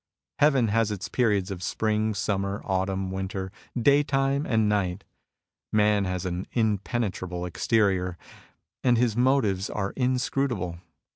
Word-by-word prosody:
Heaven 135 -6 +4
has 115 0 +2
its 100 -3 -4
periods 105 -6 +1
of 90 -2 -5
spring, 110 +2 0
summer, 100 0 -2
autumn, 95 0 -1
winter, 95 0 -4 0.3
daytime 140 +1 +2
and 110 -2 +2
night. 100 -2 0 0.7
Man 105 -1 +3
has 90 0 -3
an 90 +1 -3
impenetrable 100 -5 -1
exterior, 90 -1 +1 0.7
and 125 -2 +4
his 115 -2 +2
motives 120 -7 +2
are 100 -1 -2
inscrutable. 125 -8 -1
105 Hz, 120 wpm, -26 LUFS, 95-120 Hz, 0.7 s, Heaven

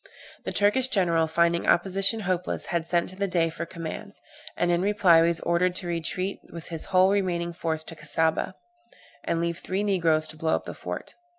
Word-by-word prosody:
The - - -2
Turkish 210 +6 +3
general, 170 -8 +2
finding 170 +1 +1
opposition 195 +5 +2
hopeless, 180 -2 -2
had 165 -1 -1
sent 170 0 +1
to 185 - -9
the 200 +1 -1
Dey 165 -3 +1
for 170 +1 -6
commands; 165 -2 -7 0.4
and 175 - +1
in 175 0 +2
reply 195 -4 +4
was 170 0 +2
ordered 180 +1 +1
to 185 - -1
retreat 175 +3 -2
with 170 -1 -9
his 165 -2 -5
whole 185 +1 +4
remaining 175 -4 -1
force 160 -2 -2
to 165 - -8
the 160 - -15
Cassaubah, 160 +3 0 0.7
and 165 - 0
leave 170 0 -2
three 190 +2 -2
negroes 165 -6 +2
to 155 - -9
blow 160 0 +1
up - - -4
the - - -6
fort. - - -7
170 Hz, 195 wpm, -26 LUFS, 165-190 Hz, 0.7 s, reply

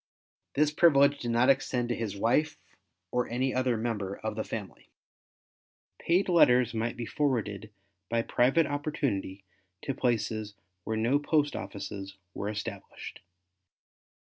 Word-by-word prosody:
This 150 +1 +3
privilege 145 -3 +5
did 120 - -4
not 120 +3 +5
extend 125 -3 -1
to 120 - 0
his 105 -4 -4
wife 145 +9 +1 0.5
or 125 -1 0
any 130 +3 0
other 125 -2 +1
member 105 -4 -2
of - - -4
the - - -2
family. - - -7 1.1
Paid 180 +4 +2
letters 125 - +5
might 115 +2 -2
be 120 - -4
forwarded 110 -4 -1 0.4
by 115 0 +1
private 135 +9 +3
opportunity 135 -10 -2 0.4
to 135 - -2
places 110 -4 -1 0.3
where 110 - -1
no 120 +6 +2
post 145 -1 +1
offices 100 -1 -6 0.2
were 100 - -3
established. 100 -1 -7
120 Hz, 130 wpm, -29 LUFS, 110-140 Hz, 1.1 s, privilege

